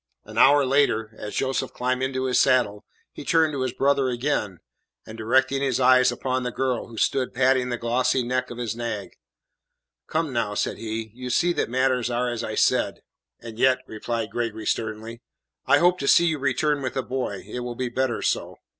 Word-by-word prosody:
An - - -11
hour 145 -1 +6
later, 125 -5 +2
as 105 - -7
Joseph 130 0 -1
climbed 125 +1 -1
into 130 0 -1
his 130 -1 +2
saddle, 105 -6 +2 0.3
he - - -9
turned 160 -2 +2
to 135 - -3
his 130 -1 -1
brother 135 +1 +1
again, 120 -7 -1 0.5
and 110 - -10
directing 130 +5 +1
his 135 -3 0
eyes 130 0 +5
upon 130 0 -2
the 125 - -2
girl, 130 0 -2
who 115 -2 -12
stood 130 +2 0
patting 130 0 +2
the 120 - -2
glossy 125 +2 +1
neck 125 +1 -1
of 120 - -8
his 115 -2 -3
nag: 110 -5 -4 1.0
"Come, 160 -3 -1
now," 115 -4 -1
said - - -2
he, 110 -1 -5
"you 125 +1 -7
see 175 +8 +2
that - - -1
matters 130 -1 +1
are 120 0 -1
as 120 -1 -4
I 110 - -4
said." - - +1 0.4
"And 115 -1 -9
yet," 130 0 +3
replied 110 -1 -4
Gregory 110 -1 -3
sternly, 110 +2 -3 0.5
"I 140 +2 +6
hope 175 +3 +3
to 140 - -3
see 170 - +6
you 160 -3 0
return 145 +1 0
with 130 -2 -4
the 135 - -1
boy. 125 -8 -4
It 125 - -5
will 120 -1 -5
be 125 0 -3
better 130 -1 -1
so." - - -1
125 Hz, 200 wpm, -24 LUFS, 115-130 Hz, 1.0 s, hour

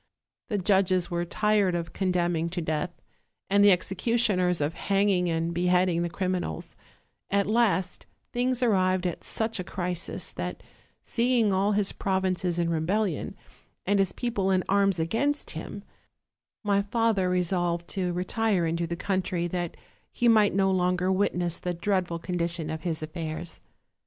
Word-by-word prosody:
The 210 - -1
judges 185 -2 +2
were 175 0 -1
tired 210 -1 +2
of 170 -1 -4
condemning 175 -3 0
to 180 +1 -3
death, 160 +1 -1 0.6
and 200 0 +5
the 205 - +8
executioners 185 -1 +1
of 150 +2 0
hanging 195 -2 +1
and 165 +1 -1
beheading 180 0 +2
t>he 170 - -1
crim 185 +2 -1
inals: 125 - -4 0.6
at 200 0 +2
last 210 -4 +1 0.3
things 250 +1 0
arrived 185 -5 +2
at 175 - -3
such 225 -1 -2
a - - -2
crisis 180 -1 -4
that, - - -5 0.4
seeing 235 -3 +2
all 195 +2 +2
his 205 -1 +1
provinces 185 -2 -1
in 170 -1 +1
rebellion, 175 +3 -1 0.5
and 200 +1 +2
his 195 -2 +2
people 215 -6 -1
in 185 -1 +2
arms 195 -1 +3
against 225 - -1
him, 185 +5 -7 0.8
my 200 -1 +2
father 205 -2 +1
resolved 175 -1 0
to 185 -2 -1
retire 185 +1 0
into 170 +1 -1
the 170 - -3
coun 190 +1 0
try, 175 -1 -2
that 175 -1 -3 0.3
he 240 - +1
might 215 -4 +5
no 195 -1 +3
longer 180 0 +1
witness 175 -3 0
the 180 -1 -3
dreadful 175 -1 -1
condi 175 -1 -1
tion 165 -2 -1
of 160 0 -4
his 160 -2 -3
affairs. 160 +1 -5
185 Hz, 155 wpm, -27 LUFS, 175-200 Hz, 0.8 s, the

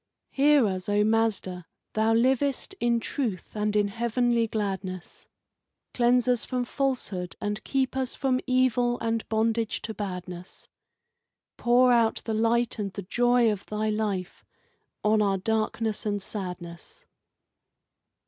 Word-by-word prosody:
Hear 285 -2 +4
us, 185 -1 -2
O 205 0 +3
Mazda! 210 -5 0 0.3
Thou 220 +1 +2
livest 265 - +1
in 235 0 +2
truth 225 -6 -4
and 210 0 -1
in 205 -1 +2
heavenly 235 +1 +1
gladness; 195 -4 -4 0.7
Cleanse 245 0 +3
us 245 -3 +2
from 250 -1 -2
falsehood, 240 -10 -2
and 210 +1 -3
keep 265 -1 -1
us 265 -1 -2
from 260 -2 +1
evil 250 -1 +2
and 225 -1 -2
bondage 225 0 0
to 220 - -4
badness, 180 -3 -7 0.9
Pour 245 +1 +4
out 230 -2 +2
the 225 - -2
light 230 +2 +1
and 200 -2 -2
the 200 - -6
joy 240 +3 +3
of 200 -2 -4
Thy 215 +1 -1
life 205 -4 -3 0.6
on 215 0 +3
our 200 -2 +2
darkness 220 +2 -1
and 205 -2 -1
sadness. 180 -4 -7
220 Hz, 130 wpm, -27 LUFS, 205-245 Hz, 0.9 s, Hear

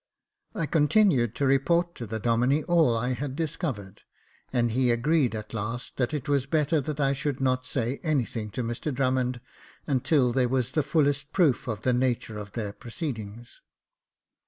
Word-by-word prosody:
I 165 -6 -1
continued 150 - +3
to 140 - 0
report 170 +6 +2
to 120 - -7
the 110 +2 -3
Domine 120 +6 +2
all 160 -9 +3
I 125 +3 0
had 135 +1 -4
discovered, 140 - -4 0.5
and 120 -2 +1
he 125 +2 +2
agreed 125 +1 +2
at 105 +1 -7
last, 115 +3 -4
that 125 -2 0
it 150 -4 -4
was 140 -2 +1
better 150 +1 +2
that 150 +2 -5
I 135 -1 +3
should 140 0 -2
not 130 -1 0
say 130 +1 -2
anything 120 -8 -1
to 125 - -2
Mr 120 +6 -3
Drummond 130 -2 0 0.4
until 130 -2 +2
there 125 -1 +2
was 130 -2 0
the 155 - +2
fullest 145 -1 +1
proof 150 -8 +2
of 110 -2 -4
the 125 - +2
nature 120 -3 -1
of 100 -1 -9
their 105 -4 -3
proceedings. 120 -3 -6
130 Hz, 170 wpm, -27 LUFS, 120-145 Hz, 0.5 s, continued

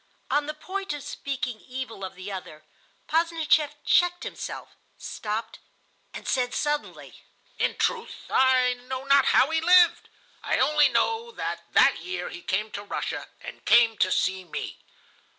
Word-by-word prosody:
On 290 0 +1
the 305 - -4
point 385 +2 -4
of 290 -2 -6
speaking 250 -5 -4
evil 250 -5 -7
of 190 0 -6
the 185 +2 -7
other, 155 -5 -8 0.4
Posdnicheff 320 -2 +2
checked 355 0 +3
himself, - - -7 0.2
stopped, 220 +1 -5 0.5
and - - -9
said 250 -2 0
suddenly: 295 0 -3 0.4
"In - - +1
truth, 465 -1 -2
I 255 -1 +4
know 255 +1 -6
not 275 0 +5
how 275 - +4
he 320 0 +1
lived. 350 0 +5 0.3
I - - 0
only 300 -1 +4
know 455 +1 0
that - - -5
that - - +5
year 370 +1 -5
he 355 - -9
came 210 - -2
to 205 - -6
Russia, 205 - -4
and - - -10
came 235 -1 +5
to 185 - +3
see 190 0 0
me. 175 - -6
270 Hz, 150 wpm, -26 LUFS, 225-325 Hz, 0.5 s, not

